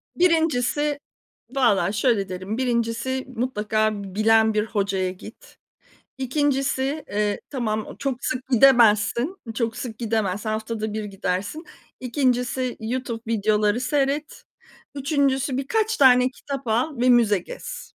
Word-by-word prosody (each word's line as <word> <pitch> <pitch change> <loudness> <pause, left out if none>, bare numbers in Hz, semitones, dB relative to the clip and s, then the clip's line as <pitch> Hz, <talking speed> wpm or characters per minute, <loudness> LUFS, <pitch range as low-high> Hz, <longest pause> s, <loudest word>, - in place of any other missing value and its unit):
Birincisi 300 -4 +1 0.6
valla 230 -7 +3
şöyle 210 -3 +1
derim: 185 +4 -4
1'incisi 240 +1 -1
mutlaka 215 -3 0
b 190 -1 -10
bilen 220 +1 +4
bir 210 0 +1
hocaya 195 -4 -1
git. 220 - -13 0.6
2'ncisi, 275 +1 0
eee, 210 0 -1
tamam, 220 -5 -2
o - - -10
çok 265 -3 -3
sık 255 0 -3
gidemezsin, 245 - +4 0.2
çok 225 -1 -2
sık 225 -4 -6
gidemez, 215 -4 -1
haftada 220 0 -3
1 215 0 -3
gidersin. 200 - -3 0.4
2'ncisi 250 -1 0
YouTube 235 0 -3
videoları 210 +1 +2
seyret. 280 +3 -1 0.5
3'üncüsü 275 -2 0
birkaç 440 +11 0
tane 255 -2 +5
kitap 275 0 -7
al 250 +7 0
ve 250 - +3
müze 230 -5 +5
gez. - - -9
245 Hz, 120 wpm, -23 LUFS, 215-270 Hz, 0.6 s, tane